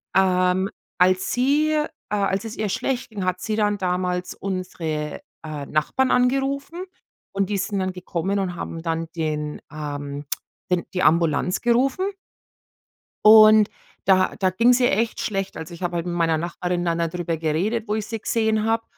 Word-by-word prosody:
Ähm, 185 0 +3 0.3
als 185 +1 +3
sie, 285 +5 +2
äh 300 0 +1 0.2
als 200 0 0
es 225 0 -6
ihr 215 -1 -2
schlecht 255 +5 -2
ging, 205 -4 -4
hat 185 0 -1
sie 215 +3 -2
dann 205 -1 +2
damals 180 -1 -1
unsere, 165 -5 -4 0.2
äh, 150 -2 -5
Nachbarn 205 +13 +1
angerufen 275 +7 0 0.5
und 195 0 -1
die 205 - +1
sind 200 +1 -2
dann 185 0 -1
gekommen 185 +2 -2
und 180 -2 -2
haben 165 -1 -6
dann 165 0 -2
den 150 -2 -3
ähm, 145 -1 -5 0.5
den 180 -1 +1
die 180 - +1
Ambulanz 165 +2 +2
gerufen. 255 +10 +2 1.2
Und 215 -1 +8 0.4
da 185 -1 +3
da 190 - +2
ging's 240 +7 +4
ihr 245 - +4
echt 225 +3 0
schlecht. 195 -2 -2
Also, 160 +2 -7
ich 170 - -11
habe 175 -1 -2
halt 170 0 -2
mit 175 - -3
meiner 165 -2 +2
Nachbarin 175 +2 -2
dann 170 -1 +1
darüber 170 0 -2
geredet, 185 +9 -1
wo 210 - 0
ich 215 -1 -2
sie 225 +1 -5
gesehen 220 0 +1
habe, 225 0 +1
185 Hz, 170 wpm, -23 LUFS, 170-220 Hz, 1.2 s, Und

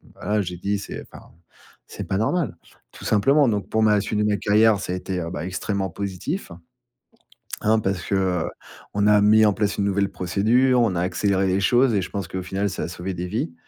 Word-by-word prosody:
Voilà, 105 0 -1
j'ai 90 -1 -5
dit: 100 +3 -2
«C'est 100 - -7
enfin, - - -14 0.5
c'est - - -7
pas 95 - -1
normal, 140 - 0 0.4
tout - - -12
simplement», 135 +7 +3
donc 105 -2 -2
pour 110 0 +1
ma 105 -1 +4
suite 105 +1 -2
de - - +2
ma 105 -1 +1
carrière, 105 +2 +3
ça 90 - -4
a - - -1
été, 90 0 -4
bah, 75 - -4
extrêmement 95 +1 -2
positif, 100 - -5 1.1
hein, 110 +1 +3
parce 95 -4 -2
qu'on 95 +2 -2
a 105 -1 +5
mis 110 +1 +6
en 105 - +4
place 100 -1 -1
une 100 - 0
nouvelle 100 0 +1
procédure, 115 +8 +2
on 110 -6 +1
a 85 - 0
accéléré 95 +1 +1
les 95 +1 +1
choses 120 +5 +3
et 100 - +2
je - - -5
pense 100 -4 -5
qu'au 95 - -4
final, 100 +2 -2
ça - - -4
a - - -3
sauvé 90 +2 -5
des 90 0 -4
vies, 85 -2 -3
100 Hz, 210 wpm, -23 LUFS, 95-105 Hz, 1.1 s, mis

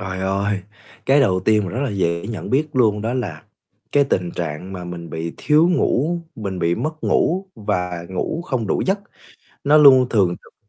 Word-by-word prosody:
Trời 95 -1 -5
ơi, 100 +1 -1 0.5
cái 140 +2 +5
đầu 95 -9 +2
tiên 105 +2 +3
mà 90 - -4
rất 125 - -3
là 140 - -1
dễ 85 -2 -1
nhận 110 -1 -6
biết 150 +4 +1
luôn 110 -6 +2
đó 115 +3 -1
là 90 -12 -4 0.5
cái 145 0 +4
tình 90 -10 -1
trạng 85 +3 -5
mà 90 -2 -6
mình 85 -1 -7
bị 80 +1 -4
thiếu 155 +3 +3
ngủ, 170 -1 +1 0.2
mình 100 -4 -5
bị 85 -1 +1
mất 155 - -4
ngủ 190 +3 +1
và 90 -4 -3
ngủ 95 - -3
không 130 -10 -2
đủ - - 0
giấc, 195 +2 +2 0.7
nó 145 +2 +5
luôn 135 -4 +7
thường 95 -6 +2
trực - - -22
105 Hz, 195 wpm, -21 LUFS, 90-140 Hz, 0.7 s, luôn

